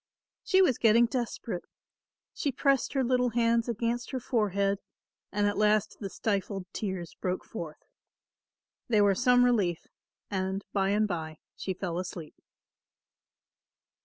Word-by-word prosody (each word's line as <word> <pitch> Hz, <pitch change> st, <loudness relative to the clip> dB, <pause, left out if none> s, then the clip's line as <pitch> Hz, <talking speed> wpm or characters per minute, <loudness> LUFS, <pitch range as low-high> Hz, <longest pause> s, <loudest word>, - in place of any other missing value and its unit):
She 380 Hz, 0 st, +4 dB
was 260 Hz, -10 st, +2 dB
getting 230 Hz, +1 st, +6 dB
desperate. 235 Hz, -6 st, -3 dB, 0.7 s
She 285 Hz, -, -1 dB
pressed 275 Hz, +1 st, +1 dB
her 270 Hz, -2 st, +2 dB
little 250 Hz, 0 st, +2 dB
hands 230 Hz, 0 st, +2 dB
against 235 Hz, +2 st, -1 dB
her 260 Hz, -, -2 dB
forehead 200 Hz, -5 st, 0 dB, 0.5 s
and 205 Hz, 0 st, +1 dB
at 205 Hz, 0 st, 0 dB
last 215 Hz, 0 st, +2 dB
the 200 Hz, -, -4 dB
stifled 195 Hz, -2 st, -2 dB
tears 190 Hz, -5 st, -4 dB
broke 185 Hz, 0 st, -3 dB
forth. 165 Hz, -7 st, -7 dB, 1.0 s
They 215 Hz, -3 st, +4 dB
were 200 Hz, -1 st, +5 dB
some 245 Hz, +3 st, +4 dB
relief 195 Hz, -9 st, +1 dB, 0.5 s
and 190 Hz, 0 st, -2 dB
bye 195 Hz, -1 st, +2 dB
and 210 Hz, +1 st, +2 dB
bye 160 Hz, -4 st, -4 dB, 0.2 s
she 190 Hz, -, -4 dB
fell 175 Hz, -2 st, -3 dB
asleep. 180 Hz, -4 st, -6 dB
210 Hz, 130 wpm, -29 LUFS, 190-240 Hz, 1.0 s, getting